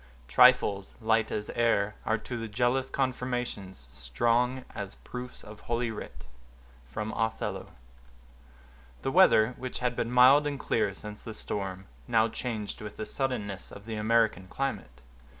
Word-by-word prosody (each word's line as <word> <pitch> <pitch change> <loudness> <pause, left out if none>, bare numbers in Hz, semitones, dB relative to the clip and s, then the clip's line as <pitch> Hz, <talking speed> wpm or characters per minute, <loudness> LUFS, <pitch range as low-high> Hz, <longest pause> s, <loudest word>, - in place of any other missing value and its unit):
Trifles, 105 - +4
light 110 -1 +2
as 105 0 -3
air, 110 -3 +2
Are 110 - +2
to 120 +3 -7
the 115 -1 -4
jealous 125 +4 +1
confirmations 125 -7 -2
strong 120 - 0
As 100 -1 -6
proofs 125 0 -9
of 105 0 -11
holy 120 0 -1
writ. 65 - -8 0.7
—Othello. 110 +1 -2 1.4
The 135 - 0
weather, 125 -10 +6
which 130 -1 -5
had 125 -1 -1
been 115 - -1
mild 130 +4 +6
and 140 -2 -3
clear 105 -6 0
since 105 0 -9
the 110 - -8
storm, 95 -3 -4 0.2
now 110 0 +4
changed 110 -3 -4
with 105 -1 -8
the 110 - -4
suddenness 105 -9 -3
of 100 - -11
the 115 - -5
American 110 -3 +2
climate. 95 - -4
115 Hz, 140 wpm, -29 LUFS, 105-125 Hz, 1.4 s, weather